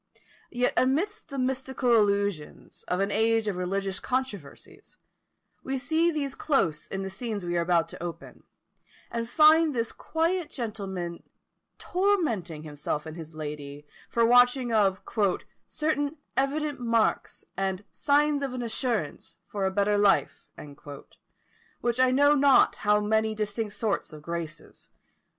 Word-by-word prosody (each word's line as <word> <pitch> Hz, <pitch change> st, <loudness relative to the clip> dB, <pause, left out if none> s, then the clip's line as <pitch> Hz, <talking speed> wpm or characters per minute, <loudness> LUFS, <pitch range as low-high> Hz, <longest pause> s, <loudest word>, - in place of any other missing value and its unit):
Yet 245 Hz, 0 st, 0 dB
amidst 325 Hz, +11 st, 0 dB
the 275 Hz, -, -6 dB
mystical 260 Hz, -1 st, 0 dB
allusions 200 Hz, -7 st, -1 dB
of 180 Hz, +1 st, 0 dB
an 200 Hz, +1 st, 0 dB
age 225 Hz, +1 st, +2 dB
of 205 Hz, -, -1 dB
religious 195 Hz, +2 st, -2 dB
controversies, 260 Hz, -, -5 dB, 0.7 s
we 270 Hz, 0 st, -2 dB
see 315 Hz, +6 st, +2 dB
these 290 Hz, -4 st, -2 dB
close 180 Hz, -, 0 dB
in 195 Hz, 0 st, -4 dB
the 195 Hz, -, -4 dB
scenes 210 Hz, -1 st, -4 dB
we 175 Hz, 0 st, -2 dB
are 170 Hz, -, +2 dB
about 170 Hz, -1 st, +2 dB
to -, -, -10 dB
open, 175 Hz, -1 st, -7 dB, 0.7 s
and 230 Hz, 0 st, -3 dB
find 310 Hz, +1 st, +5 dB
this 230 Hz, -1 st, -1 dB
quiet 330 Hz, +1 st, -1 dB
gentleman 195 Hz, -8 st, -5 dB, 0.6 s
tormenting 300 Hz, -, 0 dB
himself 150 Hz, 0 st, -4 dB
and 160 Hz, 0 st, -7 dB
his 160 Hz, -2 st, -9 dB
lady 145 Hz, -1 st, -7 dB, 0.3 s
by 235 Hz, -, +2 dB
watching 245 Hz, +2 st, +5 dB, 0.3 s
for 205 Hz, -5 st, 0 dB, 0.3 s
"certain 300 Hz, -1 st, -1 dB, 0.2 s
evident 290 Hz, +2 st, 0 dB
marks 230 Hz, -2 st, 0 dB
and 195 Hz, +1 st, -2 dB
signs 290 Hz, 0 st, +2 dB
of 270 Hz, -2 st, -3 dB
an 245 Hz, -, -3 dB
assurance 230 Hz, -, -2 dB
for 195 Hz, -2 st, -2 dB
a -, -, -1 dB
better 205 Hz, +1 st, +2 dB
life," 205 Hz, -1 st, +2 dB, 1.4 s
with 240 Hz, +1 st, 0 dB
I 255 Hz, 0 st, +5 dB
know 285 Hz, +3 st, +5 dB
not 280 Hz, -2 st, +5 dB
how 210 Hz, 0 st, +3 dB
many 220 Hz, +1 st, +1 dB
distinct 210 Hz, 0 st, -3 dB
sorts 210 Hz, -7 st, -2 dB
of 150 Hz, -1 st, -11 dB
"Graces." 170 Hz, -1 st, -7 dB
225 Hz, 135 wpm, -27 LUFS, 190-275 Hz, 1.4 s, find